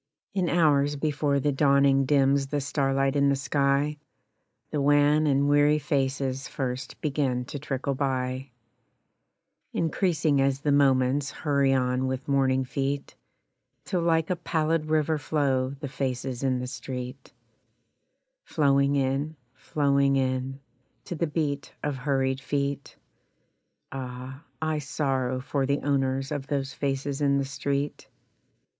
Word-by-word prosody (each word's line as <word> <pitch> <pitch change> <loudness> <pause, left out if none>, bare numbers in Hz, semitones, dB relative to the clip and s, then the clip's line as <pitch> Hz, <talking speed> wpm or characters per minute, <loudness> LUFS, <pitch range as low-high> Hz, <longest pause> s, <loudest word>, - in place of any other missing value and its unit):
In 185 -3 0
hours 145 -4 +3
before 145 -1 0
the 145 +2 +1
dawning 140 -1 +4
dims 140 0 +3
the 145 +1 -1
starlight 135 -1 0
in 140 0 +3
the 140 - +3
sky 140 +1 0 0.7
The 150 - 0
wan 145 +2 +4
and 140 0 +3
weary 145 +1 +4
faces 135 -2 -1
first 130 -1 -4
begin 135 -4 0
to 145 - -6
trickle 140 0 -2
by, 130 -1 -2 1.2
Increasing 160 -4 +1
as 135 0 +1
the 145 - +1
moments 135 0 +3
hurry 140 -2 +1
on 125 0 +1
with 130 0 -4
morning 130 -2 +2
feet, 140 +2 -3 0.7
Till 180 - -1
like 165 0 +1
a - - +2
pallid 160 -2 0
river 155 0 +1
flow 135 -3 0
the 140 +1 -6
faces 130 -2 -3
in 130 -2 +1
the 125 - -3
street 125 +1 -7 1.1
Flowing 140 - +2
in, 140 +3 0 0.2
flowing 140 -1 +1
in, 130 0 -1 0.4
To - - -5
the 165 +1 0
beat 145 -2 -2
of 145 -2 -1
hurried 135 0 0
feet 140 +1 -2 1.0
Ah! 130 +1 -7 0.2
I 155 -1 -1
sorrow 135 -3 -1
for 135 +1 -1
the 140 +1 0
owners 135 -1 0
of 140 -2 -3
those 140 -2 -2
faces 140 0 -2
in 140 -1 +3
the 140 - 0
street. 140 +1 -3
140 Hz, 130 wpm, -27 LUFS, 135-145 Hz, 1.2 s, dawning